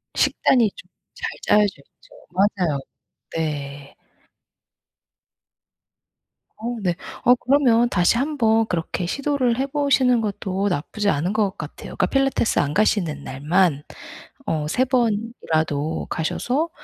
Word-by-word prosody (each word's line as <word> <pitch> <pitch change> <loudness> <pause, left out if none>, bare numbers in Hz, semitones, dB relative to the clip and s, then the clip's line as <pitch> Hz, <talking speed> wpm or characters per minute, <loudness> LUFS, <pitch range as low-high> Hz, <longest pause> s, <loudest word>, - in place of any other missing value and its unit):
식단이 235 -5 +3
좀 - - -14 0.3
잘 - - -4 0.2
짜여져 210 -1 +3
있죠. - - -21
맞아요. 185 -6 +1 0.6
네. 145 -3 -4 2.6
어 235 +3 -4
네. 175 -3 0 0.3
어 245 0 +7
그러면 245 -3 +3
다시 180 +3 +2
한번 235 -5 +2
그렇게 175 0 -2
시도를 265 +2 0
해 270 - 0
보시는 270 -4 +2
것도 195 -1 -2
나쁘지 200 +6 -1
않은 175 +6 0
것 210 -3 0
같아요. 155 -1 -8
그러니까 - - +2
필라테스 270 +2 +1
안 145 0 0
가시는 175 -9 +1
날만 150 +2 +1 0.6
어 150 -2 -1
3 250 +11 +1
번이라도 205 - -1
가셔서 260 - -1
205 Hz, 240 characters per minute, -22 LUFS, 160-245 Hz, 2.6 s, 어